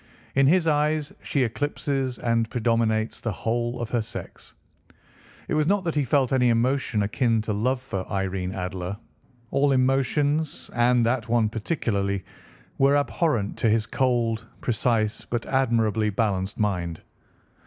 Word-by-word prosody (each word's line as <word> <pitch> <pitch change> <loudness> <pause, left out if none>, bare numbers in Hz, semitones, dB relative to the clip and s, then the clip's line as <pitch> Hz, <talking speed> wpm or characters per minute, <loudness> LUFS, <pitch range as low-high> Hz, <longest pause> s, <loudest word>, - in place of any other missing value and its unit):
In 135 0 +4
his 175 +3 +4
eyes 150 -1 +1
she 140 - 0
eclipses 135 +1 -2
and 115 -1 0
predominates 115 -2 0
the 115 - -1
whole 120 +4 -2
of 120 -2 -4
her 120 - +1
sex. 110 - -9 0.9
It - - -2
was 155 0 +2
not 200 +1 +2
that 165 -3 -1
he 145 -2 +1
felt 135 -1 +2
any 125 -2 +4
emotion 120 -2 +1
akin 110 +2 +1
to 110 - -2
love 125 +5 0
for 100 -8 -5
Irene 95 -1 -2
Adler. 90 +1 -4 0.5
All 140 0 +3
emotions, 135 +4 +1
and 120 0 +3
that 115 -1 0
one 115 -2 +3
particularly, 100 - -2 0.5
were 140 +1 +5
abhorrent 140 - 0
to 115 - +2
his 110 0 +2
cold, 115 -2 0 0.2
precise 115 -2 0
but 120 -1 -2
admirably 115 -5 +1
balanced 100 -2 -1
mind. 90 -6 -1
120 Hz, 145 wpm, -25 LUFS, 110-135 Hz, 0.9 s, were